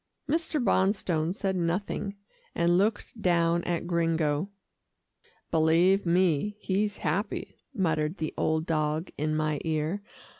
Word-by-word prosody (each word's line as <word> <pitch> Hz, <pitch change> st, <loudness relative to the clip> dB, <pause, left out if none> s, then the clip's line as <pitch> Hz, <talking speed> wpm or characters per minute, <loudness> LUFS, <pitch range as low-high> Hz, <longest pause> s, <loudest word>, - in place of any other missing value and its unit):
Mr. 315 Hz, 0 st, 0 dB
Bonstone 190 Hz, -, +1 dB
said 195 Hz, 0 st, -2 dB
nothing, 185 Hz, +3 st, -2 dB, 0.4 s
and 170 Hz, +1 st, +3 dB
looked 210 Hz, +3 st, 0 dB
down 170 Hz, -2 st, +2 dB
at 175 Hz, -1 st, -1 dB
Gringo. 165 Hz, -1 st, 0 dB, 1.0 s
"Believe 170 Hz, +4 st, +3 dB
me, 180 Hz, +3 st, +2 dB
he's 205 Hz, +2 st, -1 dB
happy," 205 Hz, +4 st, -2 dB
muttered 160 Hz, -2 st, 0 dB
the 155 Hz, -, -3 dB
old 160 Hz, 0 st, 0 dB
dog 155 Hz, +1 st, -1 dB
in 155 Hz, +1 st, -1 dB
my 155 Hz, -1 st, 0 dB
ear. 160 Hz, +4 st, -1 dB
170 Hz, 115 wpm, -28 LUFS, 160-195 Hz, 1.0 s, and